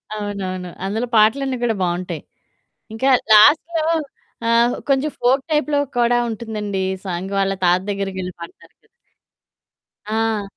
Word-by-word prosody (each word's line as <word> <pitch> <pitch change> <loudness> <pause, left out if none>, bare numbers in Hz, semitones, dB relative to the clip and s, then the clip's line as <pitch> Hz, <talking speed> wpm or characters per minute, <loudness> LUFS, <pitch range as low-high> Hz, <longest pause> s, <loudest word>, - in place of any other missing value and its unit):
అవునవును. 190 -3 -4 0.2
అందులో 220 +5 -2
పాటలన్నీ 255 +5 +3
కూడా 230 -2 +1
బావుంటాయి. 175 -1 -3 0.7
ఇంకా 260 +5 +1 0.2
లాస్ట్‌లో 310 +9 +5 0.7
ఆహ్, 235 +1 +3
కొంచెం 275 +2 +2
ఫోక్ 260 +3 +3
టైప్‌లో 300 -1 +1 0.2
కూడా 240 0 +3
ఉంటుందండి 210 -3 -4 0.2
సాంగ్, 185 +2 -4
వాళ్ళ 195 0 +1
తాత 180 +1 +4
దగ్గరికెళ్లి 195 -2 -4
పాడతారు 170 - -12
కదా! - - -32 1.2
ఆ! 220 0 -1
215 Hz, 115 wpm, -20 LUFS, 190-245 Hz, 1.2 s, లాస్ట్‌లో